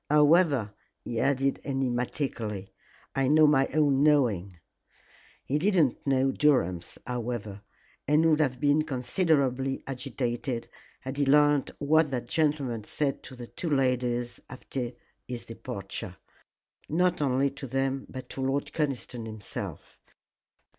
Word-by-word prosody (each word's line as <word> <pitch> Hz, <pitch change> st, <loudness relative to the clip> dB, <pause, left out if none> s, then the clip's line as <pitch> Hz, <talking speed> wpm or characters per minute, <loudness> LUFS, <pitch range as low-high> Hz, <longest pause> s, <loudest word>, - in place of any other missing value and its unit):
However," 150 Hz, -, +4 dB, 0.3 s
he 115 Hz, -, -3 dB
added 135 Hz, +1 st, +1 dB
enigmatically, 125 Hz, -6 st, -2 dB, 0.4 s
"I 135 Hz, -1 st, +1 dB
know 155 Hz, +2 st, +6 dB
my 135 Hz, -3 st, +4 dB
own 145 Hz, -2 st, +2 dB
knowing." 115 Hz, -, +2 dB, 0.9 s
He 145 Hz, +3 st, 0 dB
did 195 Hz, +5 st, +2 dB
not 145 Hz, -6 st, +2 dB
know 135 Hz, 0 st, +3 dB
Durham's, 90 Hz, -, +1 dB
however, 120 Hz, -4 st, -4 dB, 0.5 s
and 150 Hz, +3 st, +4 dB
would 155 Hz, -1 st, +3 dB
have 130 Hz, -5 st, +1 dB
been 145 Hz, +1 st, +3 dB
considerably 135 Hz, -2 st, 0 dB
agitated 125 Hz, -2 st, -3 dB, 0.3 s
had 130 Hz, +1 st, -6 dB
he 145 Hz, -, +2 dB
learned 145 Hz, 0 st, +4 dB
what 155 Hz, +2 st, +3 dB
that 125 Hz, -3 st, -3 dB
gentleman 140 Hz, -6 st, 0 dB
said 140 Hz, +5 st, -2 dB
to 130 Hz, -, -10 dB
the 120 Hz, -1 st, -8 dB
two 165 Hz, +7 st, -5 dB
ladies 125 Hz, -3 st, 0 dB
after 125 Hz, -1 st, -5 dB, 0.3 s
his 125 Hz, -2 st, -5 dB
departure. 95 Hz, -4 st, -6 dB, 0.7 s
Not 180 Hz, +1 st, +2 dB
only 135 Hz, 0 st, +2 dB
to 135 Hz, 0 st, -7 dB
them 135 Hz, +1 st, -1 dB
but 130 Hz, -1 st, -8 dB
to 135 Hz, -, -5 dB
Lord 135 Hz, +2 st, -1 dB
Conniston 130 Hz, -6 st, -2 dB
himself. 110 Hz, -2 st, -7 dB
135 Hz, 125 wpm, -28 LUFS, 120-145 Hz, 0.9 s, know